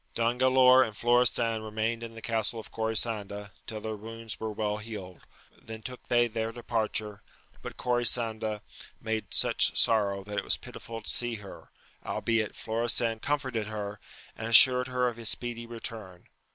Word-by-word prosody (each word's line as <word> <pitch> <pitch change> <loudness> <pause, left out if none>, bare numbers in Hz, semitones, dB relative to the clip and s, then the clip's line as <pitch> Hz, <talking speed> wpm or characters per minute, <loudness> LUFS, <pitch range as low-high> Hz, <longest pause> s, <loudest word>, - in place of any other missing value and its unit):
I - - -2
ON 120 +2 +1
GALAOR 130 0 +7
and 110 -3 -5
Florestan 120 -2 +3
remained 110 +2 -2
in 115 -1 -7
the 115 - -10
castle 115 0 -1
of 110 - -10
Corisanda 110 -2 -1 0.2
till 110 -1 -5
their 110 0 -4
wounds 115 +1 -8
were 110 -1 -3
well 105 0 -1
healed, 105 -5 -8 0.4
then 110 -1 -9
took 125 +1 -6
they 120 0 +4
their 115 0 -3
departure; 110 -3 -2 0.4
but - - -8
Corisanda 115 -3 +1 0.4
made 110 -1 -3
such - - +2
sorrow 100 -3 +2
that 105 +1 -6
it - - 0
was - - +1
pitiful 115 -1 -9
to - - -11
see 120 -1 0
her, 105 -3 -11 0.3
albeit 115 -2 -1
Florestan 115 0 +1
comforted 130 -5 -1
her, 105 -1 -5 0.4
and 110 - -5
assured 125 +2 +7
her 125 -1 +1
of 120 -1 -3
his 115 -2 0
speedy 120 -1 -2
return. 110 -6 -8
115 Hz, 165 wpm, -29 LUFS, 110-120 Hz, 0.4 s, GALAOR